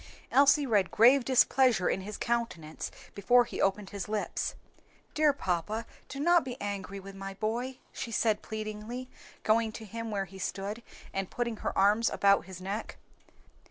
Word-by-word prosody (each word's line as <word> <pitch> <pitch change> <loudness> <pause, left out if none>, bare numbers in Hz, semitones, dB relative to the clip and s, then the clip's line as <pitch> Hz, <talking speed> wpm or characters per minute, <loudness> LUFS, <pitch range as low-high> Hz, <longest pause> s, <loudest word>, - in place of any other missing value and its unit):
Elsie 285 +1 +5
read 210 -6 +2
grave 250 +4 +6
displeasure 255 -4 +4
in 190 - 0
his 210 +2 -6
countenance 230 -10 -2 0.2
before 245 +5 +4
he - - -5
opened 195 0 0
his 200 -1 -5
lips. 215 -1 -2 0.6
"Dear 305 -1 +4
papa, 215 - -2 0.2
do 275 - -6
not 345 +3 +4
be 250 -1 -6
angry 200 -1 -4
with 195 +1 -10
my 195 0 -7
boy," 235 +6 -2 0.2
she - - -5
said 215 -1 +1
pleadingly, 220 +4 -6 0.3
going 220 0 +2
to 220 - -8
him 230 +2 -5
where 200 -2 -1
he 190 +1 -12
stood, 200 +4 -4 0.3
and 195 -1 -2
putting 235 -2 -2
her - - -3
arms 205 +4 +4
about 200 -4 +3
his 185 -1 -9
neck. 195 +4 -5
215 Hz, 160 wpm, -30 LUFS, 195-240 Hz, 0.6 s, grave